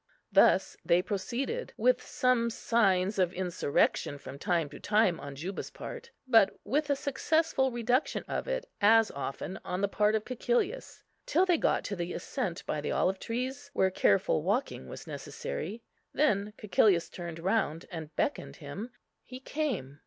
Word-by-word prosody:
Thus - - +4
they 175 +1 +3
proceeded, 235 - -3
with - - +3
some 250 -2 +1
signs 200 -4 +2
of 180 -2 +3
insurrection 175 -5 0
from 140 0 -10
time 170 -2 +1
to - - -10
time 205 -5 +2
on 140 0 -7
Juba's 180 +8 -5
part, 475 -1 -8 0.2
but 225 -6 +4
with 295 +2 0
a 285 - +3
successful 280 0 +1
reduction 245 +3 0
of - - -3
it - - -2 0.2
as 225 +2 +6
often 140 +6 -5
on 180 +1 -3
the 200 - +3
part 210 +2 +2
of 215 - -1
Cæcilius, 255 - -1 0.2
till 350 +5 +3
they 350 -4 +3
got - - +2
to 200 - -3
the 175 -1 -3
ascent 200 -10 -4
by 150 - -2
the - - -3
olive 190 +1 +1
trees, 260 +5 -4
where 190 -6 +2
careful 185 -4 +3
walking 210 - -1
was - - -8
necessary. 465 - -5 0.3
Then 210 -8 +2
Cæcilius 180 -3 +3
turned 170 -2 -6
round, 175 -2 0
and 160 -3 -7
beckoned 290 - -1
him. 175 - -7 0.3
He 255 0 -9
came. 255 - -3
210 Hz, 160 wpm, -30 LUFS, 180-265 Hz, 0.3 s, as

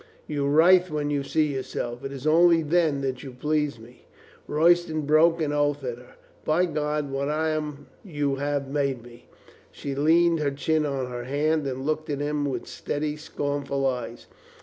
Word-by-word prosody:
You 145 -2 -2
writhe 175 +5 +5
when 150 -1 -2
you 145 -1 0
see 150 +1 0
yourself. 120 -1 -4
It 135 - -5
is 135 0 -8
only 165 +1 +5
then 155 -3 +1 0.2
you 130 -1 -9
please 150 0 -1
me." 115 +2 -17 0.4
Royston 160 0 +3
broke 155 +3 +4
an 150 -2 -1
oath 145 -1 0
at 120 -2 -4
her. 125 - -17 0.3
"By 165 +4 +2
God, 150 -3 -2
what 140 +1 -2
I 155 +1 0
am 150 -2 -4 0.2
you 145 -7 -2
have 145 0 -2
made 135 -3 -1
me." 120 0 -15 0.4
She 140 - -5
leaned 165 +4 +3
her 150 -2 +1
chin 150 +2 0
on 135 -3 -3
her 120 0 -5
hand 150 +2 0
and 130 0 -4
looked 155 +1 -2
at 145 - -1
him 145 0 -1
with 140 - -3
steady, 150 0 -3
scornful 145 -2 -3
eyes. 125 -2 -3
145 Hz, 175 wpm, -25 LUFS, 140-155 Hz, 0.4 s, writhe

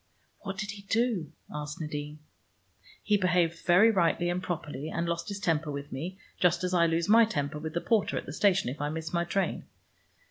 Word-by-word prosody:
"What 195 -2 -6
did 210 0 -3
he 200 0 -9
do?" 210 -6 0 0.2
asked 150 0 -5
Nadine. 150 -1 -5 0.9
"He 210 - +3
behaved 175 -3 +1
very 195 +6 +7
rightly 175 -2 +2
and 180 +1 -2
properly, 155 -4 -4
and 170 +1 -2
lost 170 +2 -2
his 200 -1 -4
temper 160 -5 0
with 140 0 -5
me, 170 +8 -5 0.2
just 180 0 +3
as 180 0 -1
I 170 -2 +4
lose 165 +1 0
my 225 +3 +7
temper 150 -9 -2
with 160 +1 -6
the 170 - 0
porter 225 -3 +1
at - - -4
the 145 - -7
station 195 -1 +3
if 135 +4 -4
I 145 - 0
miss 160 +1 -5
my 170 0 +1
train. 190 +1 -1
170 Hz, 205 wpm, -29 LUFS, 155-195 Hz, 0.9 s, very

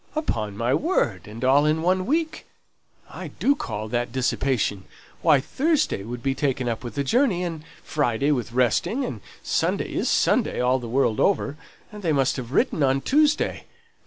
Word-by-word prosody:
"Upon 110 - -2
my 120 +3 +1
word! 115 - 0
and 110 +4 -8
all 135 +3 +5
in 155 +1 +1
one 185 +2 +1
week? 315 +2 -1 0.6
I - - -8
do 280 - +1
call 110 - -5
that 120 +1 -1
dissipation. 125 -6 0 0.4
Why, 150 -4 +5
Thursday 300 - 0
would 120 +3 -7
be 135 - +1
taken 135 -2 -1
up 115 0 -3
with 120 -3 -7
the 140 - 0
journey, 215 - +2
and 165 -3 -4 0.2
Friday 140 -1 0
with 120 -5 -1
resting, 130 - +1
and 110 - -6 0.2
Sunday - - -1
is - - 0
Sunday - - +2
all 125 +1 +2
the 120 -2 -7
world 120 -3 +1
over; 150 -7 +1 0.4
and 210 -1 -9
they 165 -5 +1
must 135 -2 +2
have 125 -2 -6
written 150 - +1
on 135 0 +2
Tuesday. 300 - +1
135 Hz, 175 wpm, -24 LUFS, 120-185 Hz, 0.6 s, all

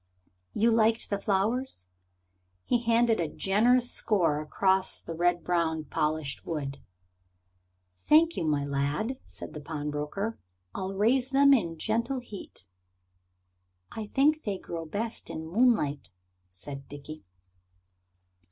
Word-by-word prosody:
"You 230 +2 +3
liked 225 0 +2
the 200 - 0
flowers?" 205 - -1 0.8
He 240 - +1
handed 230 -1 +3
a 165 - 0
generous 235 +9 +2
score 170 -9 +1
across 190 +5 +1
the 165 - -7
red 175 +1 +1
brown 165 -3 0
polished 150 -1 -2
wood. 140 -4 -4 1.1
"Thank 315 - +4
you, - - -2
my 145 -3 0
lad," 145 - -1
said - - -9
the 150 - -7
pawnbroker. 150 +8 -4 0.3
"I'll 190 +1 -4
raise 245 +6 +2
them 280 +1 +6
in 170 -10 +1
gentle 235 - -1
heat." 205 - -10 1.3
"I 220 -2 -6
think 300 +6 +3
they 205 -7 -3
grow 165 -3 -6
best 220 +7 -4
by - - -5
moonlight," 160 - +1 0.4
said 135 +10 -8
Dickie. 145 0 -9
190 Hz, 120 wpm, -28 LUFS, 150-230 Hz, 1.3 s, them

